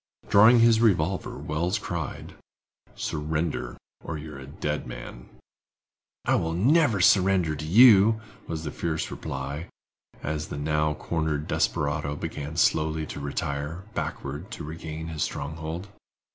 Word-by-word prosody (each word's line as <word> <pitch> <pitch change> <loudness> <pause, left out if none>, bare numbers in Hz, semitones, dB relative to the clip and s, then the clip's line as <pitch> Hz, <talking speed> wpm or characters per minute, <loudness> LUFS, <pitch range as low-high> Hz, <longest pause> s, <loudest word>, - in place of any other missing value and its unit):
Drawing 115 +4 +7
his 115 -1 +5
revolver, 95 -4 +1
Wells 85 +7 -1
cried: 85 -7 -5 0.6
"Surrender 75 -4 -2 0.3
or 80 - -4
you 75 +1 -8
are 70 - -8
a 65 - -10
dead 75 0 -3
man!" - - -9 1.0
"I - - +3
never 115 - +3
will - - 0
surrender 95 -5 +4
to 75 +1 -6
you," 110 +2 +7 0.3
was 80 -1 -4
the 75 - -4
fierce 80 0 -2
reply, 70 +5 -5 0.6
as 75 0 -2
the - - -6
now 75 +1 0
cornered 80 -1 -2
desperado 70 0 0
began 75 0 -5
slowly 80 -1 +2
to - - -7
retire, 70 +4 -3
backward, 75 +7 -4
to - - -6
regain 80 +1 -6
his 80 -2 -5
stronghold. 80 +5 -4
80 Hz, 130 wpm, -26 LUFS, 75-90 Hz, 1.0 s, Drawing